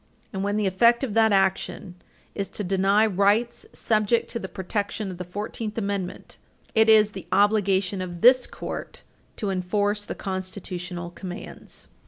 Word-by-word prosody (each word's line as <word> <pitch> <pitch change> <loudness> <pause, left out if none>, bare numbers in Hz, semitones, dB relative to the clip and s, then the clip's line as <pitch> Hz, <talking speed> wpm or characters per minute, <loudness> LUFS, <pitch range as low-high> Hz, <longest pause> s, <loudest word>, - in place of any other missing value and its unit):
And 190 0 -2
when 205 +1 0
the 210 - +1
effect 235 +7 +4
of 240 -6 -2
that 220 0 +4
action 195 -1 0 0.4
is 200 -1 -3
to 210 - -5
deny 195 +3 +3
rights 210 +4 +1
subject 215 +1 +1
to 235 - -3
the 190 - -5
protection 200 +2 -3
of 180 - -9
the - - -3
Fourteenth 210 +4 -5
Amendment, 200 -4 -4 0.4
it 220 -1 +4
is 215 -1 +6
the 190 -2 -9
obligation 200 -1 +2
of 175 -2 -6
this 255 +1 +6
Court - - -7 0.3
to 205 -4 -2
enforce 205 +3 0
the - - -6
constitutional 185 -2 -5
commands. 180 0 -8
200 Hz, 155 wpm, -25 LUFS, 185-215 Hz, 0.4 s, is